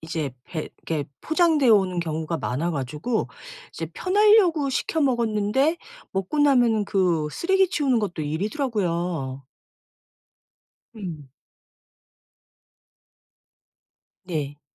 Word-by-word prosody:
이제 160 Hz, -4 st, -3 dB
배 155 Hz, -2 st, -5 dB, 0.2 s
이렇게 155 Hz, -3 st, -1 dB, 0.2 s
포장되어 315 Hz, -6 st, +3 dB
오는 185 Hz, -4 st, +3 dB
경우가 160 Hz, 0 st, -3 dB
많아 160 Hz, +8 st, -2 dB
가지고 150 Hz, -, -2 dB, 0.4 s
이제 -, -, -5 dB
편하려고 370 Hz, -7 st, +4 dB
시켜 320 Hz, +4 st, -1 dB
먹었는데 240 Hz, +3 st, +1 dB, 0.3 s
먹고 195 Hz, +10 st, -1 dB
나면은 245 Hz, -7 st, +4 dB
그 175 Hz, -6 st, +1 dB
쓰레기 380 Hz, -, +2 dB
치우는 275 Hz, -9 st, +1 dB
것도 185 Hz, -6 st, -3 dB
일이더라고요. 170 Hz, -, -2 dB, 1.5 s
음. 160 Hz, -9 st, -7 dB, 2.9 s
네. 145 Hz, -5 st, -4 dB
200 Hz, 220 characters per minute, -24 LUFS, -, 2.9 s, 편하려고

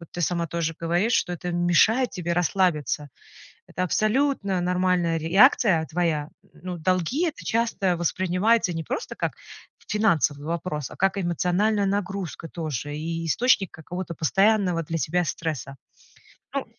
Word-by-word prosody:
Вот 170 Hz, -, -12 dB
ты 175 Hz, -, -6 dB
сама 170 Hz, 0 st, 0 dB
тоже 165 Hz, -1 st, -2 dB
говоришь, 175 Hz, +7 st, 0 dB
что 180 Hz, -, +1 dB
это 175 Hz, +1 st, -4 dB
мешает 175 Hz, +9 st, +3 dB
тебе 175 Hz, -2 st, -3 dB
расслабиться. 170 Hz, -5 st, 0 dB, 0.6 s
Это 180 Hz, -, -3 dB
абсолютно 215 Hz, -, +1 dB
нормальная 180 Hz, -2 st, +1 dB
реакция 180 Hz, -, +4 dB
твоя. 160 Hz, -3 st, -1 dB, 0.2 s
Н -, -, -19 dB
ну 180 Hz, -1 st, -4 dB
долги- 185 Hz, -, 0 dB
это 315 Hz, -, -6 dB
часто 225 Hz, -5 st, +1 dB
воспринимается 185 Hz, +4 st, +1 dB
не 165 Hz, 0 st, -3 dB
просто 435 Hz, -, -4 dB
как -, -, -2 dB, 0.5 s
финансовый 160 Hz, -9 st, +1 dB
вопрос, 165 Hz, -4 st, -3 dB
а -, -, -11 dB
как 195 Hz, +1 st, +1 dB
эмоциональная 190 Hz, +4 st, +1 dB
нагрузка 195 Hz, -4 st, -3 dB
тоже 145 Hz, -3 st, -4 dB
и 165 Hz, +2 st, -3 dB
источник 195 Hz, +2 st, +2 dB
какого-то 170 Hz, +2 st, -7 dB
постоянного 195 Hz, 0 st, +2 dB
для 165 Hz, +1 st, -3 dB
тебя 170 Hz, +4 st, 0 dB
стресса. 150 Hz, -5 st, -4 dB, 0.8 s
Ну -, -, -1 dB
175 Hz, 140 wpm, -25 LUFS, 165-195 Hz, 0.8 s, реакция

